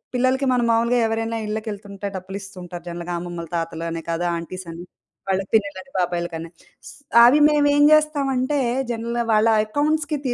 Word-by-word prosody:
పిల్లలకి 260 +2 +1
మనం 245 -1 +1
మామూలుగా 235 +2 +2
ఎవరైనా 225 +1 -2
ఇళ్ళకెళ్తుంటే 205 -2 -5
డబ్బులిస్తుంటారు 185 -2 -8
జనరల్‌గా 175 +1 -5
అమ్మమ్మలు, 175 -2 -7
తాతలనే 165 0 -3
కదు, 165 +1 -1
ఆంటీస్ 185 +2 -6
అని 170 +1 -8 0.5
వాళ్ళ 190 0 +1
పిన్నిలని, 200 +2 0
బాబాయిలకని. 170 -2 -2 0.8
అవి 260 +5 +6
మేమేం 290 -1 +3
చేస్తామంటే, 285 -3 +1 0.3
జనరల్‌గా 235 +1 -2
వాళ్ళ 215 +1 +4 0.2
అకౌంట్స్‌కి 295 +5 0
తి 245 - 0
215 Hz, 130 wpm, -22 LUFS, 175-255 Hz, 0.8 s, అవి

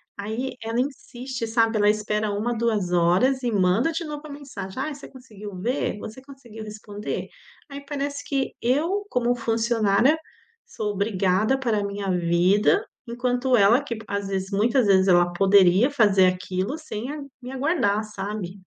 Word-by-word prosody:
Aí, 220 +6 -4
ela 225 +2 -2
insiste, 255 -2 -4
sabe? 225 0 +2
Ela 205 0 +4
espera 210 0 0
1, 225 +4 -1
2 220 -6 0
horas 180 +10 +3
e 245 -2 -1
manda 200 - +2
de 330 +1 -3
novo 295 -1 -6
a 305 - -9
mensagem: 260 -7 -8
"Ai, 295 +2 -2
você 275 - -11
conseguiu 210 -6 -11
ver?", 240 +1 -1
"Você 220 +5 -9
conseguiu 260 -5 -11
responder?". 210 -1 -6 0.4
Aí, 280 0 -8
parece 285 0 -4
que 275 -2 -2
eu, 320 +12 +1
como 245 0 +1
funcionária, 230 +3 +2 0.5
sou 210 -2 -4
obrigada 200 +3 +1
a - - -2
parar 235 -5 0
a - - -2
minha 200 -1 -4
vida, 180 - +2 0.2
enquanto 245 +1 +1
ela 220 +6 +5
que 240 -5 -4
p 220 - -11
às 200 0 -3
vezes 190 0 -3
muitas 230 +4 +2
vezes, 190 -1 +4
ela 175 -1 +4
poderia 195 +4 +5
fazer 205 -8 +4
aquilo 185 +7 -2
sem 260 -4 -6
a 305 - -6 0.2
me 250 +1 -8
aguardar, 260 - +1
sabe? 200 -2 -6
220 Hz, 165 wpm, -24 LUFS, 200-260 Hz, 0.5 s, ela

